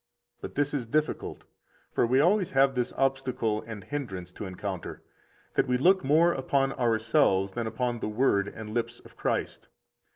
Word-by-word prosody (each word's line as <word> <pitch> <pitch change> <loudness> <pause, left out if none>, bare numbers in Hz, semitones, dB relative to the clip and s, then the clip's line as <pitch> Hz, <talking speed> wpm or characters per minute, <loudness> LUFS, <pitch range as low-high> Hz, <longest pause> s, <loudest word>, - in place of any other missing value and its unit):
63 - - -41
But - - -7
this 145 0 0
is 135 -5 -1
difficult; 155 +5 -2 0.5
for - - +2
we 130 +3 +3
always 185 +3 +3
have 135 0 +4
this 125 -1 -1
obstacle 130 -5 0
and 110 -4 -7
hindrance 95 -10 -5
to 100 - -7
encounter, 95 0 -6 0.5
that - - +2
we 125 0 +2
look 185 +7 +4
more 160 +5 +4
upon 135 0 0
ourselves 110 -4 +2
than 115 +2 -3
upon 120 +1 -2
the 110 - -3
Word 105 -3 +2
and 110 0 -8
lips 120 +1 -2
of - - -17
Christ. - - -2
125 Hz, 170 wpm, -28 LUFS, 110-140 Hz, 0.5 s, have